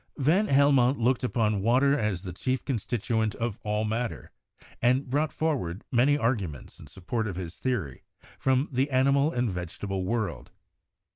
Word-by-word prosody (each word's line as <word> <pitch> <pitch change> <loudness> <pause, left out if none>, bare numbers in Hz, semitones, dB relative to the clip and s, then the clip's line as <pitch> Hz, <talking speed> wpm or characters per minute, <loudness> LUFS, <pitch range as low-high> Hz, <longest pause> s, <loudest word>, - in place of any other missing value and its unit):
Van 165 +10 +2
Helmont 140 -2 +4
looked 120 +2 +1
upon 110 -5 +1
water 130 +6 +3
as 105 - -1
the 90 -3 -6
chief 130 +8 -2
constit 120 -2 -2
uent 110 -3 0
of 115 -2 -3
all 105 0 -1
matter, 115 +2 -3 0.5
and 125 +3 +2
brought 150 +2 +1
forward 125 - -2
many 130 +4 +4
arguments 100 - -2
in - - -12
support 110 +5 -3
of 95 - -4
his 90 -2 -6
theory 105 - -2 0.4
from 130 +2 +2
the 135 +2 +1
animal 140 +3 +3
and 120 -5 0
vegetable 95 +2 -4
world. 105 -2 -2
120 Hz, 155 wpm, -27 LUFS, 105-135 Hz, 0.5 s, Helmont